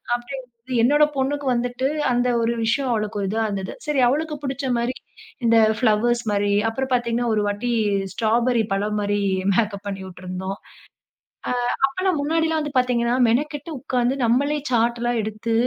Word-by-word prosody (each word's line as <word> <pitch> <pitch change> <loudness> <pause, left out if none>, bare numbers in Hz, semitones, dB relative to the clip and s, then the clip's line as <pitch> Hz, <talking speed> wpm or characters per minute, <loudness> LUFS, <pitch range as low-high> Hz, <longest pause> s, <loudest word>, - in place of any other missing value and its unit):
அப்டிங்கும்போது 245 0 -7
என்னோட 290 +6 +4
பொண்ணுக்கு 280 +2 -1
வந்துட்டு 245 +2 0 0.2
அந்த 245 +1 +2
ஒரு 230 +1 +1
விஷயம் 260 +4 +1
அவளுக்கு 215 -2 -1
ஒரு 195 - -1
இதா 220 +3 -1
இருந்தது. 195 -2 -4
சரி 300 -3 0
அவளுக்கு 300 +4 0
புடிச்ச 270 0 -3
மாரி, 235 +2 -1 0.5
இந்த 230 0 +5 0.2
ஃபிளவர்ஸ் 235 +1 +2
மாரி, 205 0 +1 0.2
அப்புறம் 265 +3 -3
பாத்தீங்கன்னா 240 -1 0
ஒரு 210 - +2
வாட்டி 205 +4 -2 0.4
ஸ்ட்ராபெரி 230 +2 +2
பழம் 205 +2 0
மாரி 205 0 0 0.3
மேக்கப் 205 -1 0
பண்ணியுட்ருந்தோம். 190 0 -5 0.9
அ - - 0 0.4
அப்பலாம் 370 +4 -1
முன்னாடிலாம் 320 +2 +1
வந்து 295 -1 -5
பாத்தீங்கன்னா 245 -1 +1
மெனக்கெட்டு 290 +7 -1
உட்கார்ந்து 250 -1 0
நம்மளே 280 +6 +2
சார்ட் 235 0 +2
எல்லாம் 240 -1 0
எடுத்து, 220 +2 -3
240 Hz, 145 wpm, -22 LUFS, 215-265 Hz, 0.9 s, இந்த